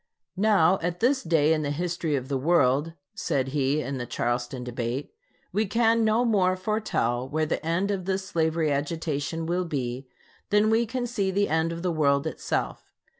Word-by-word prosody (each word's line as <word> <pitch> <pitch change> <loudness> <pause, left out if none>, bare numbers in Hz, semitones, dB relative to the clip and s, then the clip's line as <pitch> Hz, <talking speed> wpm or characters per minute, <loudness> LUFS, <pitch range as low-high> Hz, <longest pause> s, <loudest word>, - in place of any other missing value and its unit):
Now, 195 -3 +4
at 175 +1 -2
this 265 +3 +2
day 160 -2 +3
in 155 - 0
the 145 - -2
history 165 0 -1
of 130 -2 -3
the 140 - -2
world 145 0 +2 0.2
[said 135 -1 -1
he, 140 +1 +1
in 135 +1 -4
the 120 - -4
Charleston 120 +2 -2
debate], 125 +2 -4 0.4
we 215 0 0
can 230 +2 +3
no 220 +3 +3
more 190 -5 +3
foretell 185 - -1
where 155 +1 0
the 155 - -2
end 170 +5 0
of 190 -3 -3
this 190 0 -1
slavery 160 -4 0
agitation 150 +2 -2
will 175 +2 0
be 130 -4 -4 0.4
than 210 +1 +3
we 230 +1 +2
can 250 +2 -2
see 220 -5 -1
the 200 +2 +1
end 160 +1 +1
of 170 +1 -6
the 180 - +1
world 140 -2 +2
itself. 160 - -3
165 Hz, 180 wpm, -26 LUFS, 140-195 Hz, 0.4 s, Now